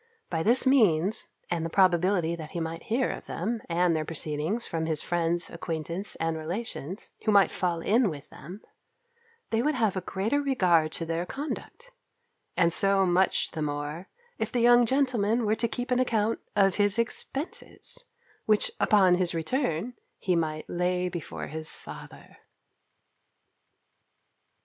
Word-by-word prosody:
By 165 -2 0
this 235 +10 +5
means, 215 - +3 0.2
and 170 -2 0
the 165 - -2
probability 180 -1 +3
that 160 -2 -8
he 170 - -2
might 165 0 -5
hear 250 +4 +1
of - - -8
them, 220 +6 -3
and 170 0 +2
their 155 - 0
proceedings, 155 +7 -2
from 160 -1 -3
his 155 -2 0
friends, 170 0 -1
acquaintance, 170 +3 -4
and 165 0 -1
relations, 175 +1 -5
who 215 - +2
might 200 -1 +5
fall 175 -2 -1
in 225 +3 +3
with 145 -4 -8
them, 180 +9 -10 0.9
they 225 0 +2
would 300 +4 +1
have 220 -6 +1
a 185 - -1
greater 210 +10 -1
regard 180 - +2
to 165 - -4
their 165 +2 -2
conduct; 315 - -6 0.7
and 170 -2 +3
so 195 0 +4
much 180 +1 +2
the 160 - -5
more, 150 +4 -4 0.3
if 220 0 -2
the 245 - 0
young 240 0 +6
gentleman 240 -4 +1
were 210 - +2
to 230 +1 0
keep 245 +3 -4
an 250 - +3
account 225 -3 +1 0.2
of 195 -2 +3
his 205 0 +3
expences, 255 +6 -3 0.4
which, 215 -1 +3
upon 190 -4 +5
his 180 -2 0
return, 185 - -1 0.2
he 185 -2 0
might 155 -2 -2
lay 180 +1 0
before 170 -4 -6
his 155 +1 -3
father. - - -12
185 Hz, 155 wpm, -27 LUFS, 165-225 Hz, 0.9 s, young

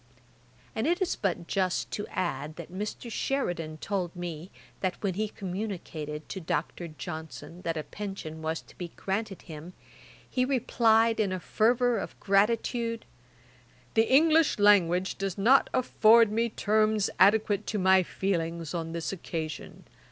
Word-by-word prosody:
And 220 +6 0
it 345 +2 +2
is 375 -3 0
but 180 -3 -2
just 185 0 -1
to 205 - -4
add, 155 -4 -3
that 170 0 -9
Mr. 210 +4 -5
Sheridan 175 - -2
told 185 0 -3
me, 175 -1 -6 0.3
that 185 -2 -1
when 195 -2 0
he 215 +4 -1
communicated 180 -7 -5
to 190 - -5
Dr. 170 +1 -3
Johnson 160 0 -8
that 165 -2 -2
a 155 - -3
pension 195 -6 -7
was 160 +1 -2
to - - -19
be 175 - -5
granted 195 0 -3
him, 160 +1 -9 0.5
he 255 - 0
replied 230 -3 +3
in 205 -3 +1
a 185 - -2
fervour 235 +4 +2
of - - -7
gratitude, 230 +3 +1 0.9
'The 225 +2 +3
English 315 +3 +5
language 190 -3 +4
does 195 -1 -2
not 245 +7 +5
afford 230 -3 +5
me 230 +2 +1
terms 215 -1 +1
adequate 205 +1 +4
to 215 - -1
my 190 -1 +5
feelings 170 -3 -2
on 165 -1 -3
this 170 +2 -3
occasion. 160 -4 -6
195 Hz, 145 wpm, -28 LUFS, 170-220 Hz, 0.9 s, English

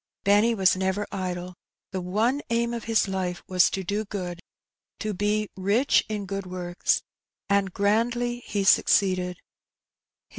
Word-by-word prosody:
Benny 210 +4 +4
was 190 -3 +4
never 190 +2 -1
idle. 180 -1 -3
• - - -13 0.4
The 190 -2 -3
one 220 +10 0
aim 235 0 0
of 235 -2 -5
his 225 -2 +2
life 185 -2 -3
was 180 -1 +4
to 190 - -3
do 205 +4 -1
good, 180 -4 -5 0.6
to 215 -1 -3
be 210 +2 0
"rich 205 +9 +2
in 210 -2 -3
good 195 0 -4
works;'' 180 -1 -1 0.5
and 200 -1 +2
grandly 235 +5 +1
he 205 -2 -2
suc 195 - +5
ceeded. 185 -2 +2
200 Hz, 150 wpm, -26 LUFS, 185-215 Hz, 0.6 s, suc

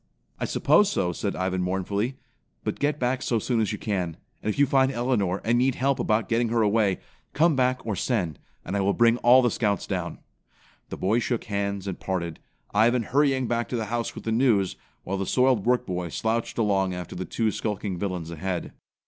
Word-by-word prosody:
"I - - -1
suppose 195 +8 +3
so," 90 -1 0
said 100 +3 -3
Ivan 95 0 -1
mournfully, 100 +7 -1 0.5
"but - - -3
get 145 +1 +1
back 125 -1 0
so 120 - 0
soon 115 +1 0
as 105 - 0
you - - -3
can. 90 -6 -2 0.2
And - - -2
if - - -6
you 140 - +5
find 135 -1 +3
Elinor, 120 -7 0
and 120 +2 +3
need 130 0 +2
help 135 0 +1
about 110 -1 +1
getting 115 0 +1
her 115 -1 +2
away, 105 -2 +2 0.4
come 160 +1 +3
back 130 0 +1
or 110 -3 -1
send, 90 - -1 0.3
and 100 - -3
I 100 - +1
will 100 +1 +1
bring 115 0 +4
all 125 +2 +6
the 120 - +2
Scouts 105 -4 0
down." - - -3 0.7
The - - -5
boys 110 +6 +1
shook 120 -1 -1
hands 100 -1 -2
and 95 -3 -4
parted, 85 -4 -3 0.3
Ivan 115 +3 +3
hurrying 135 +1 +2
back 120 0 -1
to - - -2
the 115 -2 -1
house 120 -1 -2
with - - -8
the 115 - -2
news, 110 -5 +2 0.3
while 100 +2 -3
the 95 - -3
soiled 125 -5 +2
work 125 0 +3
boy 90 -3 -3
slouched 110 +7 -2
along 95 -4 +1
after 90 -2 -7
the 90 - -3
two 110 +3 0
skulking 105 -4 -3
villains 90 -4 -3
ahead. 90 +2 -4
110 Hz, 210 wpm, -26 LUFS, 95-125 Hz, 0.7 s, all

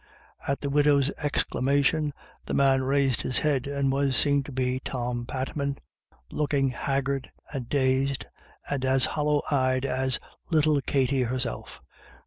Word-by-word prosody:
At 140 - -1
the 140 - -2
widow's 145 -1 +4
exclamation 145 +1 +1 0.4
the - - -1
man 135 -1 +4
raised 135 -1 +1
his 130 - -1
head, 140 -2 +1
and 140 -1 0
was 135 -1 +1
seen 145 -1 +3
to 145 - -8
be 130 0 -1
Tom 120 -2 -3
Patman, 140 +1 -3 0.5
looking 140 -2 +1
haggard 135 +1 -2 0.2
and 130 -4 -5
dazed, 135 0 +1 0.4
and 140 -2 -2
as 130 0 +3
hollow 150 -1 0
eyed 130 -1 +2
as 130 -1 0 0.3
little 155 -3 +3
Katty 135 -1 +1
herself. 125 - -3
135 Hz, 135 wpm, -27 LUFS, 130-140 Hz, 0.5 s, widow's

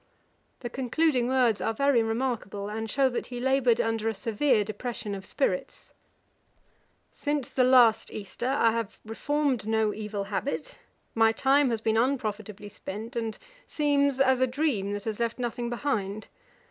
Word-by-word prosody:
The 240 - -4
concluding 260 0 +1
words 250 -5 +2
are 225 - -1
very 275 -1 +3
remarkable, 225 -3 -2
and 220 +1 -4
shew 270 +4 +3
that 245 - -4
he 245 -1 -6
laboured 255 -2 +2
under 225 0 0
a 220 - -3
severe 225 +2 +1
depression 215 0 -5
of 195 -1 -7
spirits. 185 -10 -2 1.2
'Since 290 -3 -2
the 255 - +2
last 245 -3 +5
Easter 215 +4 -5
I 245 -4 +3
have 230 -2 -3
reformed 265 0 -1
no 220 -1 +1
evil 210 -2 -4
habit, 275 - -4 0.3
my 225 0 +4
time 270 +4 +3
has 225 -2 -1
been 220 0 +1
unprofitably 220 -5 -2
spent, 215 +5 -7
and 225 -2 -3 0.3
seems 285 -2 +1
as 260 -1 +3
a 260 - +4
dream 245 -7 -1
that 205 0 -4
has 220 0 -4
left 235 -1 -1
nothing 240 -1 -3
behind. 215 -5 -2
235 Hz, 155 wpm, -27 LUFS, 215-265 Hz, 1.2 s, last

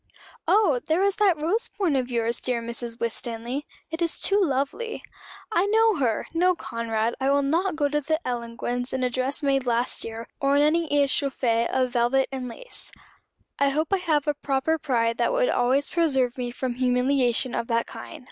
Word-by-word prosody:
'Oh 390 - +4
there 325 +4 +2
is 400 0 +1
that 395 -5 +4
rose 345 +10 0
point 370 -9 0
of 255 -2 0
yours, 235 -1 -1
dear 250 -2 -1
Mrs. 235 0 -6
Winstanley; 235 +4 -3 0.2
it 325 +1 -4
is 335 -1 0
too 400 +1 +1
lovely.' 285 - -1 0.5
I 395 -2 +2
know 440 -1 +4
her! 235 -6 0
No, 360 +2 +3
Conrad; 230 -5 -2
I 265 - +2
will 280 0 +3
not 335 +6 +1
go 295 -2 +1
to 295 +1 0
the 315 +2 0
Ellangowans 245 +1 -3
in 260 -1 -1
a 250 - +1
dress 260 +4 -2
made 270 -2 +1
last 240 +1 0
year; 225 0 -6
or 275 0 +2
in 290 - +5
any 320 +1 +2
réchauffé 270 -5 +1
of 255 -1 +1
velvet 245 +2 +2
and 260 -2 -4
lace. - - -7 0.7
I 280 0 +4
hope 310 +5 -1
I - - +5
have 315 -6 +1
a 295 - +1
proper 290 +3 0
pride 230 -5 0
that - - +2
would - - +2
always 260 +3 +1
preserve 265 -8 +1
me 250 -2 -3
from 245 +1 -3
humiliation 250 0 +2
of 230 - -2
that 230 -1 +1
kind. - - -9
270 Hz, 190 wpm, -25 LUFS, 245-315 Hz, 0.7 s, in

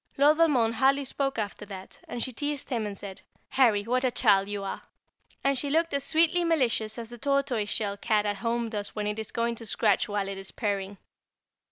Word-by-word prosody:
Lord 295 +2 +5
Valmond 260 -9 +3
hardly 270 +4 +3
spoke 270 +1 -2
after 210 -1 -3
that, 190 -2 -10
and 240 - -3
she 255 - -4
teased 290 +2 -3
him 225 -4 -1
and 200 -1 -6
said: 195 -1 -8 0.3
"Harry, 225 -6 +3
what 250 +4 0
a 255 - +3
child 205 -5 +3
you 205 -1 -3
are!" 195 - -4 0.6
and 275 -1 +2
she 285 - -1
looked 330 +2 +1
as 280 -1 0
sweetly 330 +3 +3
malicious 250 -9 +1
as 230 0 -7
the 240 - -9
tortoise 275 -6 0
shell 200 -2 -1
cat 210 0 +1
at 205 -1 -1
home 235 +2 -1
does 205 -2 -2
when 210 -1 -2
it 210 +1 -2
is 220 - -4
going 235 0 0
to 230 0 -8
scratch 210 -1 +2
while 205 -1 -1
it 195 0 -5
is 195 - -8
purring. 200 -2 -3
230 Hz, 215 wpm, -28 LUFS, 205-275 Hz, 0.6 s, Lord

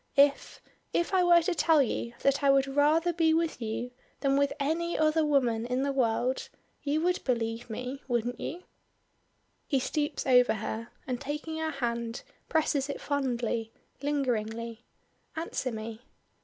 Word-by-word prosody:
If 280 0 +3 0.3
if 345 +3 0
I 370 -1 +4
were 345 -1 +6
to 360 - +1
tell 320 -3 +4
you 235 -1 -3
that 275 +1 +2
I 280 - +5
would 275 0 +5
rather 300 +5 +3
be 320 -1 +3
with 330 -5 -1
you 230 +2 -3 0.3
than 275 -1 +2
with 280 0 +3
any 330 +4 0
other 310 +1 +3
woman 245 -6 +2
in 250 +2 0
the 280 - +1
world, 250 0 0 0.3
you 295 +2 0
would 360 +2 +1
believe 230 -2 -1
me, 250 +5 -5
wouldn't 240 0 -1
you?" 355 +3 -5 1.0
He 275 - +2
stoops 295 +3 -2
over 250 -3 +5
her, 220 +2 -4 0.2
and 250 -2 -3
taking 300 +3 -4
her 320 0 -1
hand 235 -4 -3 0.3
presses 300 -3 +1
it 280 - -4
fondly, 240 -5 -1 0.3
lingeringly. 235 -5 -2 0.5
"Answer 320 -5 -2
me." 220 0 -6
275 Hz, 155 wpm, -29 LUFS, 235-310 Hz, 1.0 s, were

